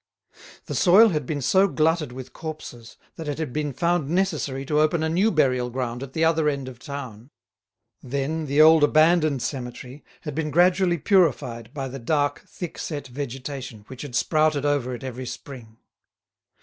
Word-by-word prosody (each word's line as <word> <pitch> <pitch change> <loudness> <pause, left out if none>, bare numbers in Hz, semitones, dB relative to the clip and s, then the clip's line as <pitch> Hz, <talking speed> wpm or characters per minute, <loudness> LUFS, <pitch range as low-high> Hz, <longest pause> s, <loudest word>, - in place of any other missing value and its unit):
The - - -5
soil 210 +5 +6
had 150 -7 -2
been 145 -3 -3
so 190 +8 +4
glutted 160 -4 +1
with 130 +1 -9
corpses 155 -7 -8 0.2
that 160 - -6
it 145 - -3
had 155 -6 -4
been 150 -1 -2
found 170 +2 0
necessary 160 -7 -1
to 150 +2 +1
open 155 +1 +2
a 160 - 0
new 185 +7 +2
burial 130 - +1
ground 125 -1 -4
at 135 -1 -8
the 160 0 +2
other 160 -2 +3
end 140 -2 -3
of 125 -2 -10
town. 130 -5 -8 0.7
Then 140 +4 -3
the 140 +2 +3
old 160 -1 +7
abandoned 155 -2 +3
cemetery 125 +1 -6 0.2
had 150 -3 -6
been 155 +1 -2
gradually 175 +2 +3
purified 130 - +1
by 135 -2 -4
the 135 +1 -7
dark 145 +3 0
thick 175 -3 -7
set 145 -4 -5
vegetation 130 -3 -6
which 130 -2 -9
had 140 -5 -7
sprouted 155 0 +2
over 135 -4 0
it 120 - -10
every 130 -1 -6
spring. 120 -4 -9
145 Hz, 175 wpm, -24 LUFS, 130-160 Hz, 0.7 s, old